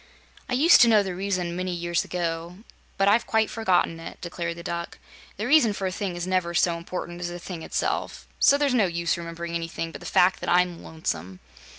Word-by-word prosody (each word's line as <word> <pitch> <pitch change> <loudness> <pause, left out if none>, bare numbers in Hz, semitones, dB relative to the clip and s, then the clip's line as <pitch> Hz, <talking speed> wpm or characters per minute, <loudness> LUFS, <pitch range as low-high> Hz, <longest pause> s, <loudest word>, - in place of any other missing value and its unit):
"I - - -2
used 300 +8 +6
to 240 - +8
know 215 -3 +5
the 190 -2 -4
reason, 185 -2 -2
many 185 0 -2
years 175 0 -1
ago, 170 0 -3 0.4
but 195 0 +2
I've 215 +4 +3
quite 220 -1 +1
forgotten 180 -6 +1
it," 165 - -9
declared 170 -1 -4
the 170 - -8
Duck. 170 0 -5 0.4
"The 210 - -3
reason 250 -5 +5
for 195 - -4
a 185 - -1
thing 185 -1 -3
is 175 0 -3
never 185 -2 0
so 170 0 +3
important 175 0 -6
as 175 - -2
the 175 - -6
thing 175 -1 -7
itself, - - -2
so 280 - +6
there's 285 -2 +1
no 220 -6 +3
use 170 -1 -1
remembering 170 0 -6
anything 165 0 -3
but - - -10
the - - -7
fact 180 +1 +3
that - - -4
I'm 180 -1 +2
lonesome." 95 - -5
175 Hz, 215 wpm, -25 LUFS, 170-195 Hz, 0.4 s, to